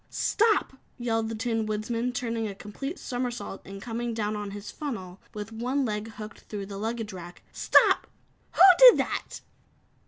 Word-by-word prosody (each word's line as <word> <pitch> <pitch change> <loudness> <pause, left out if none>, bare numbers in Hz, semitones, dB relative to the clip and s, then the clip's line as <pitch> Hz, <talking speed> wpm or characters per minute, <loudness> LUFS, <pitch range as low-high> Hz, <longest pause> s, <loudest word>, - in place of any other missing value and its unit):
"Stop!" 435 -8 +1 0.2
yelled 225 -2 -1
the 225 - -4
Tin 225 0 -1
Woodman, 230 +3 -2
turning 230 -2 -2
a 200 - -6
complete 270 - -6
somersault 245 -5 -4
and 195 0 -9
coming 235 +2 -4
down 215 -1 -1
on 205 -1 -4
his 200 +1 -8
funnel 195 - -6 0.2
with 210 +1 -6
one 250 +5 -1
leg 210 -1 -3
hooked 215 0 -9
through 205 -2 -7
the 195 0 -7
luggage 225 -1 -3
rack. 175 -1 -10
"Stop! - - +4 0.5
Who - - 0 0.2
did - - +10
that?" - - -3
225 Hz, 160 wpm, -27 LUFS, 210-240 Hz, 0.5 s, did